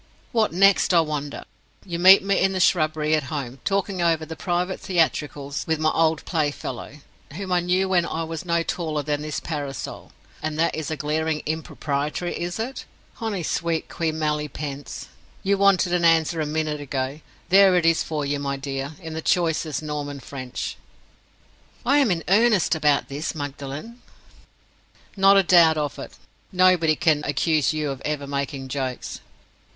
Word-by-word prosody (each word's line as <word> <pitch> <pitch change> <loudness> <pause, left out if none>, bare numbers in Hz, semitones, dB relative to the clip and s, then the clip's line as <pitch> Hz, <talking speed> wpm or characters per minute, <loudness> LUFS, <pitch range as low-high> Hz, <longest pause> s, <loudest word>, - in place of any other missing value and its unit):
"What 225 -2 +2
next, 195 +1 +4
I 170 - +7
wonder? 150 -2 -4 0.4
You 170 -3 -4
meet 190 +2 +8
me 195 0 +1
in 195 - +2
the 190 - -1
shrubbery 155 -4 +2
at 155 -3 +1
home, 135 -4 -5
talking 195 -1 -1
over 165 -2 +2
the 160 - -7
private 180 +2 -2
theatricals 150 -5 -1
with 160 -1 +1
my 155 0 +2
old 160 -1 +1
playfellow, 145 -3 -3 0.3
whom 190 0 -5
I 180 - +3
knew 180 +2 +1
when 175 -2 +2
I 165 - -3
was 165 +2 -5
no 170 -1 +1
taller 155 -4 -2
than 145 0 -1
this 155 0 -3
parasol. 145 -5 -6 0.3
And 155 0 -3
that 165 +1 +2
is 155 -2 -4
a 155 - -3
glaring 155 +1 -1
impropriety, 150 +1 -2
is 175 0 -4
it? 240 +4 -5 0.3
'Honi 215 -6 -3
soit 165 +1 -1
qui 165 -1 -1
mal 155 -1 0
y 150 0 -4
pense.' 145 -2 -7 0.4
You 195 0 +1
wanted 195 -3 +4
an 175 -1 +1
answer 165 -1 +3
a 150 - -1
minute 155 -1 -2
ago—there 145 +8 +1
it 175 -2 +2
is 165 0 +4
for 150 -2 -3
you, 145 0 -1
my 140 -1 -2
dear, 135 +1 -4
in 160 -1 -6
the 160 - -4
choicest 160 -3 0
Norman 145 -2 -4
French." 130 -2 -6 1.1
"I 280 +3 +4
am 275 -5 +3
in 170 -3 0
earnest 210 -2 +4
about 150 -3 +2
this, 145 +4 -4
Magdalen—" 145 - -6 1.1
"Not 195 0 +6
a 195 - +5
doubt 170 -3 +6
of 145 -2 -2
it. - - -8 0.4
Nobody 180 -4 +4
can 150 -1 +2
accuse 145 +1 +1
you 155 -2 -2
of 135 -1 -7
ever 150 -2 -2
making 140 -1 -3
jokes." 130 -2 -4
160 Hz, 170 wpm, -24 LUFS, 145-180 Hz, 1.1 s, meet